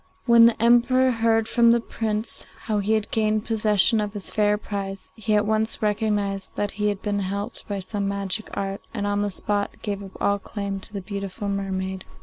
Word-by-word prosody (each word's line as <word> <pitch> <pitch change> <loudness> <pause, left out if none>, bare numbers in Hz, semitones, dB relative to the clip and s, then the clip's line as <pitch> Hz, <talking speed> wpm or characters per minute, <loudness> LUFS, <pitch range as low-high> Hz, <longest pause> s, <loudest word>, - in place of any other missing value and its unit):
When 235 -1 +7
the 235 - 0
Emperor 240 +2 +4
heard 225 -1 +2
from 235 0 +4
the 235 0 +5
Prince 220 -1 -3 0.2
how 215 -2 0
he 205 +2 +1
had 215 -1 -1
gained 215 -1 +1
possession 215 -1 +3
of 210 -1 -3
his 205 -3 -4
fair 210 -1 +2
prize, 195 -2 -6
he 220 -1 0
at 210 0 +3
once 220 +1 +4
recognized 205 -2 -1
that 205 -1 -1
he 210 0 -1
had 205 -2 -4
been 205 -1 -1
helped 200 +4 -4
by 200 -1 -3
some 200 +1 -3
magic 200 +1 -3
art, 195 0 -3
and 205 -2 -2
on 205 0 0
the 205 - 0
spot 205 +1 -2
gave 200 -2 -3
up 195 - -11
all 200 0 +1
claim 200 -1 -5
to 195 - -7
the 200 - -4
beautiful 200 +1 -5
mermaid. 190 -1 -3
205 Hz, 200 wpm, -24 LUFS, 200-220 Hz, 0.2 s, When